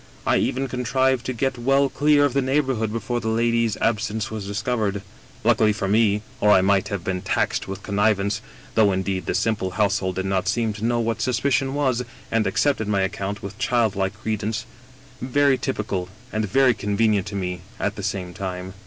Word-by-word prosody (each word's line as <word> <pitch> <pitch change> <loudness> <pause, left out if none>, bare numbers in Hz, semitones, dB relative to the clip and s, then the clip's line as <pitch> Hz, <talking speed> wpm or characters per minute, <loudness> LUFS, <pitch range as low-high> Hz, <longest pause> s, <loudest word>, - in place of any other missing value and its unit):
I - - +3
even 135 +1 0
contrived 130 +1 0
to - - 0
get 130 +1 -1
well 135 +3 +3
clear 145 +1 +3
of 140 - 0
the 140 - +2
neighborhood 130 -5 0
before 115 +2 -2
the 110 - -5
lady's 115 -1 +1
ab 110 -1 +1
sence 110 0 -3
was 105 -3 -5
discovered. 105 -2 -1 0.4
Luckily 110 -1 +4
for 100 -1 -3
me— 105 0 +3 0.2
or 105 - +3
I 95 - +7
might 95 0 +2
have 100 -5 -4
been 95 -1 -2
taxed - - 0
with 95 0 -6
connivance, 100 0 +1 0.3
though 110 -3 +4
indeed 95 0 -2
the - - 0
simple 110 -4 0
household 100 -3 +1
did 95 - -2
not 95 -1 0
seem 110 +2 +1
to 105 +1 -8
know 120 0 +1
what 115 -1 -1
suspicion 135 +2 +1
was, 130 -4 +1 0.3
and 110 -2 +2
accepted 110 +2 +1
my 100 -2 +1
account 100 +1 -3
with 100 +2 -7
childlike 100 -5 0
credence 110 0 -2 0.3
— 130 -1 -24
very 140 +2 +3
t)rpical, 100 -8 -2 0.3
and 110 -1 -1
very 130 +3 +4
convenient 105 -1 +1
to 100 - -6
me 90 -3 -3 0.2
at - - -1
the - - -6
same 90 -3 -3
time." 95 0 -5
110 Hz, 190 wpm, -23 LUFS, 100-125 Hz, 0.4 s, I